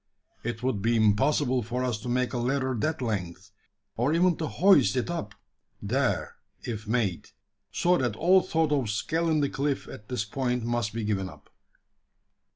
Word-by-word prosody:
It 120 0 -4
would 125 -6 0
be 115 +3 +2
impossible 125 +5 +2
for 125 +3 -3
us 120 -4 -1
to 125 - -6
make 125 +1 0
a 120 - -1
ladder 130 +2 0
that 140 +5 -1
length 95 -3 -4 0.4
or 125 +6 +1
even 175 0 +3
to 160 - -2
hoist 145 - +4
it 125 +7 -1
up 105 -12 -5 0.4
there - - -1 0.3
if 110 -3 -5
made 110 -6 -1 0.4
so 175 0 +2
that 120 -5 0
all 185 +8 +5
thought 160 -4 0
of 135 -7 +1
scaling 155 +7 0
the 140 - +1
cliff 140 0 -2
at 105 - -11
this 125 -4 -2
point 125 +1 -2
must 120 -2 -1
be 115 +2 -4
given 100 -3 -1
up." - - -16
125 Hz, 170 wpm, -27 LUFS, 110-145 Hz, 0.4 s, all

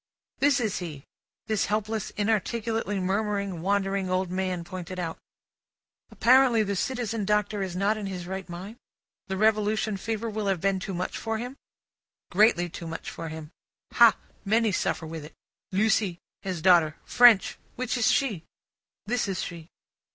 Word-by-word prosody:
This 285 -1 +4
is 220 -5 -1
he; 155 -6 -7 0.4
this 215 -2 0
helpless, 215 0 -1
inarticulately 220 0 0
murmuring, 200 -1 -1
wandering 195 0 0
old 185 0 0
man 185 -2 -2
pointed 185 +1 -7
out. 165 -2 -4 0.9
"Apparently 250 -2 +5
the 200 -1 -2
Citizen 230 0 -2
Doctor 210 0 +1
is 185 -2 -3
not 200 +3 +1
in 205 -2 -4
his 180 -2 -5
right 190 0 -6
mind? 190 +6 -8 0.5
The 190 - -3
Revolution 215 0 +2
fever 225 +3 -3
will 215 -2 -3
have 195 -3 +1
been 195 +2 +1
too 190 0 -5
much 180 +1 -3
for 225 0 -2
him?" 245 +4 -6 0.8
Greatly 185 -2 +4
too 170 0 -8
much 165 0 -6
for 165 -1 -6
him. 155 0 -8 0.4
"Hah! - - +7 0.3
Many 220 +2 +2
suffer 170 -2 -1
with 160 -1 -6
it. 150 - -12 0.4
Lucie. 205 -2 +2 0.2
His 180 -5 -4
daughter. 170 -4 +5
French. 240 -5 +5 0.2
Which 250 0 -2
is 240 -3 +3
she?" 215 -12 +1 0.6
This 230 0 0
is 190 -2 -2
she. 170 -1 -8
200 Hz, 155 wpm, -27 LUFS, 180-220 Hz, 0.9 s, Hah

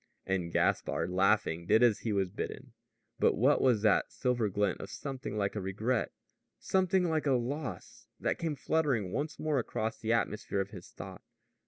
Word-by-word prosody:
And 90 -3 -1
Gaspard, 85 +1 +1
laughing, 90 -3 +2
did 110 - +5
as 115 -4 +4
he 115 - -2
was 95 -3 0
bidden. - - -6 0.5
But - - +4
what 130 +7 +4
was 120 -5 +3
that 105 - +3
silver 120 -5 0
glint 100 -1 0
of - - -7
something 135 -6 -5
like 100 0 -1
a 105 - -2
regret, 110 +6 -1 0.5
something 190 -1 +2
like 160 -2 0
a 135 - +4
loss, 125 -3 -4
that - - -1
came 160 -3 -1
fluttering 135 - 0
once 150 +7 -2
more 155 -3 0
across 110 -1 -3
the 110 - -1
atmosphere 105 -3 0
of 95 +1 -2
his 90 -5 -10
thought? - - -9
115 Hz, 175 wpm, -31 LUFS, 100-140 Hz, 0.5 s, did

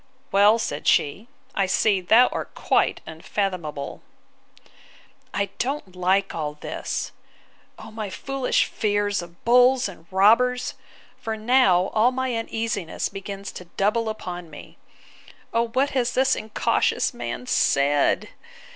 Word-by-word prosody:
Well, 205 +3 +5
said 150 -10 -4
she, 190 +10 +2 0.3
I 195 -1 +1
see 195 +1 +2
thou 225 +7 +6
art - - -6
quite - - +1
unfathomable! 160 -3 -4 1.3
I 200 0 -1
don't 255 -8 -3
like 190 +2 +1
all 150 -2 -4
this. 150 - -4 0.7
O - - -11
my 215 -2 -5
foolish 270 +6 0
fears 205 -2 -1
of 170 0 -14
bulls 250 +1 +5
and 175 -4 -12
robbers!—For 225 +2 0
now 215 -6 +3
all 225 +3 +4
my 260 -1 -2
uneasiness 225 -6 -3
begins 195 0 -7
to 180 - -10
double 215 +6 0
upon 180 -5 -6
me. 150 - -13 0.7
O 235 +1 +2
what 265 +5 0
has 250 -2 0
this 265 +1 +3
incautious 215 0 0
man - - -5
said! 140 - +2
205 Hz, 120 wpm, -24 LUFS, 180-235 Hz, 1.3 s, thou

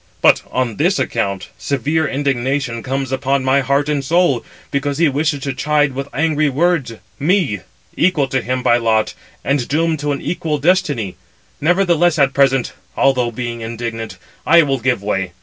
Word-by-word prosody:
But - - +5
on 125 -4 -2
this 180 +6 +2
account 100 -2 -2
severe 145 +3 0
indignation 135 -3 -1
comes 135 +2 -3
upon 135 0 0
my 135 +1 +3
heart 140 +2 +1
and 145 -2 -1
soul, 160 -4 +2 0.3
because 140 0 -1
he 165 0 +4
wishes 145 0 0
to 140 - -2
chide 145 +1 +1
with 135 +1 -4
angry 155 +1 +1
words 150 -3 +1 0.3
me, 150 - +1 0.4
equal 170 -6 +2
to 130 -1 0
him 125 +1 -2
by 120 -1 +4
lot, 110 -2 +1 0.3
and 140 -3 0
doomed 160 +2 0
to 145 0 -1
an 140 - -2
equal 160 -3 -2
destiny. 145 - 0 0.4
Nevertheless, 175 0 +3
at 135 -2 +3
present, 135 -2 +2 0.2
although 125 -3 +2
being 120 0 -5
indignant, 115 -2 -5 0.3
I 170 0 +6
will 135 -2 -1
give 125 -4 0
way. 95 -3 -2
140 Hz, 165 wpm, -18 LUFS, 120-150 Hz, 0.4 s, I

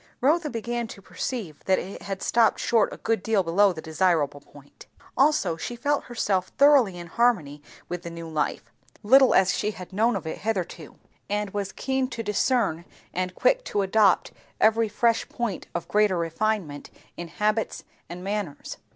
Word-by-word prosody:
Rotha 300 +4 +2
began 235 -1 -3
to 200 - -10
perceive 195 - -5
that 190 -1 +3
it 195 - -6
had 195 -1 -5
stopped 230 -2 +3
short 230 -3 +2
a - - -8
good 225 -3 -1
deal 215 -2 +1
below 190 +4 +3
the 160 -3 -8
desirable 160 -4 +1
point. 145 0 -17 0.3
Also 280 - +2
she 240 +8 -5
felt 285 +4 -1
herself 195 -6 -1
thoroughly 275 -10 +5
in 175 - -7
harmony 170 -8 +1 0.3
with 175 0 -5
the 170 - -7
new 165 0 -8
life, 155 -2 -3 0.3
little 260 +4 +6
as 190 +1 +4
she 210 - -1
had 185 -3 -9
known 225 +5 +2
of - - -4
it 160 - -5
hitherto; 185 -7 -4 0.3
and 205 0 -2
was 200 -1 -3
keen 265 +3 -1
to 235 -3 -5
discern 210 -5 +1 0.3
and 185 0 -2
quick - - +2
to 205 - 0
adopt 195 -1 +3 0.3
every 220 0 +3
fresh 230 +1 +1
point 235 -5 -4
of 170 - -3
greater 210 -3 +2
refinement 170 -2 -2 0.3
in 175 - -6
habits 210 +6 -1 0.3
and 175 +1 -8
manners. 200 -6 -4
205 Hz, 170 wpm, -25 LUFS, 175-230 Hz, 0.3 s, little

